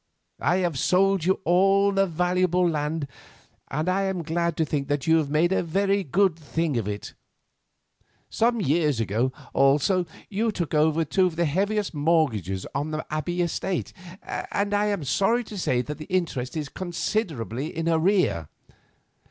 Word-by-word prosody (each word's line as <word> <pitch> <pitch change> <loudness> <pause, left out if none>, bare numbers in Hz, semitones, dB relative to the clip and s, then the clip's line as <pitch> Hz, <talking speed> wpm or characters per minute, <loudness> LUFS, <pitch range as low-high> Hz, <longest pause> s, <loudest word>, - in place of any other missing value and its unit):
I 175 - +2
have 160 -7 -2
sold 190 +1 +2
you 190 +2 +1
all 195 +3 +4
the 195 0 +2
valuable 180 +1 +1
land, 150 -1 -2 0.6
and 155 +4 -2
I 195 +2 +1
am 190 -3 -2
glad 170 0 -1
to 160 - +2
think 140 -2 -2
that 145 -1 -1
you 160 0 +4
have 155 -3 0
made 160 +4 +2
a 190 - +2
very 195 +4 +1
good 185 +3 +2
thing 160 0 -2
of 115 -4 -1
it. 105 0 -5 1.1
Some 235 +1 +1
years 150 - +1
ago, 115 +4 0 0.2
also, 150 +7 +3 0.2
you 220 +3 0
took 170 -6 -4
over 155 +1 +3
the - - 0
two 185 +6 +2
heaviest 185 +6 0
mortgages 140 - 0
on 145 +3 -2
the 155 0 -4
Abbey 175 +4 -1
estate, 175 +2 -2 0.3
and 205 0 -3
I 205 +1 +2
am 200 -6 -1
sorry 200 - +1
to 215 - -10
say 125 -10 0
that 150 +3 -6
the 155 - -7
interest 160 -7 -2
is 150 -2 -3
considerably 155 - -3
in 165 0 -4
arrear. 165 - +2
165 Hz, 160 wpm, -25 LUFS, 150-190 Hz, 1.1 s, all